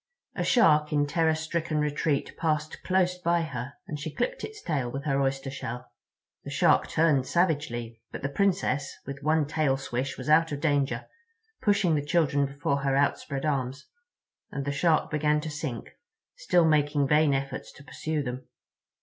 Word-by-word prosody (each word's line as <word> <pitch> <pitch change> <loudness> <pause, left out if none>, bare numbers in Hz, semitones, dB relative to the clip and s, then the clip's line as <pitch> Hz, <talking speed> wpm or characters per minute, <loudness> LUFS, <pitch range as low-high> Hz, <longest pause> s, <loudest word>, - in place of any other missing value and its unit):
A - - -1
Shark 150 -11 +4
in 145 -1 +2
terror 160 +2 +2
stricken 160 0 -2
retreat 150 -1 0
passed 155 -2 -1
close 180 -1 +1
by 170 -1 +1
her, 140 -3 -5
and 155 -6 -5
she 155 +2 -4
clipped - - -2
its 435 -1 -7
tail 140 -7 -2
with 135 +3 -5
her 140 -2 +1
oyster 135 0 -1
shell. 125 -2 -6 0.5
The - - -7
Shark - - +3
turned 150 -5 +2
savagely, 120 -10 -1
but - - -7
the 135 - 0
Princess 180 -4 0
with 140 0 -7
one 155 +1 +2
tail 145 -2 +1
swish 135 0 -3
was 130 - -7
out 160 +1 +4
of 145 - -3
danger, 145 -3 0 0.6
pushing 200 -5 +3
the 145 -2 +1
children 145 -2 +2
before 140 +1 -1
her 140 -1 0
outspread 140 0 0
arms, 135 -2 -2 0.6
and 140 -1 -4
the 140 - -1
Shark 155 +3 +2
began 150 0 +2
to 155 0 -5
sink, 145 -5 -5 0.4
still 180 - +3
making 145 -2 +2
vain 150 0 +4
efforts 135 0 -4
to 140 - -14
pursue 155 +1 -3
them. 125 0 -6
150 Hz, 170 wpm, -27 LUFS, 140-160 Hz, 0.6 s, Shark